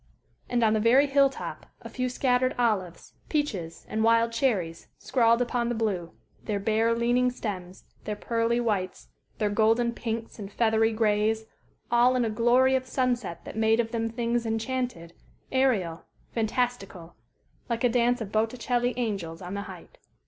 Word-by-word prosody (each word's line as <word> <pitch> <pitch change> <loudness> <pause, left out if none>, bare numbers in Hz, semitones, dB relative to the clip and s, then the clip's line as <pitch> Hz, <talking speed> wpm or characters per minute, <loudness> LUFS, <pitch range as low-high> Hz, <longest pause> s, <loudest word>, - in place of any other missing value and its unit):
And 245 -1 +1
on 220 -1 +4
the 220 - +2
very 245 +6 +5
hill 280 -1 +4
top - - -8 0.2
a - - -7
few 255 -1 -2
scattered 255 0 +1
olives, 205 -8 -1 0.2
peaches, 210 - -2
and 220 0 -1
wild 230 0 +4
cherries 205 -9 -1
scrawled 235 -2 +2
upon 240 -1 -1
the 240 - -1
blue, 195 -7 -2 0.3
their 205 -2 -2
bare, 225 +3 +1
leaning 240 +2 +2
stems, 190 -7 -6 0.2
their 210 - -2
pearly 230 +2 0
whites, 190 - -2 0.3
their 210 -1 0
golden 225 +3 +3
pinks 225 -1 -5
and 200 -1 -7
feathery 225 0 +2
grays 220 0 +1 0.5
all 240 +2 +4
in 245 -2 +2
a 220 - -1
glory 245 +4 +3
of 260 -1 0
sunset 245 -10 -2
that - - -8
made 220 +1 +3
of 225 -1 0
them 225 -1 -1
things 235 0 -1
enchanted, 225 -6 -3 0.4
aerial, 220 -11 +1 0.3
fantastical, 220 -7 -2 0.6
like 235 0 -2
a - - +6
dance 245 0 +2
of 205 -3 -5
Botticelli 240 +3 0
angels 195 -9 -3
on 180 0 -7
the 200 - -3
height. - - -12
230 Hz, 160 wpm, -27 LUFS, 210-245 Hz, 0.6 s, a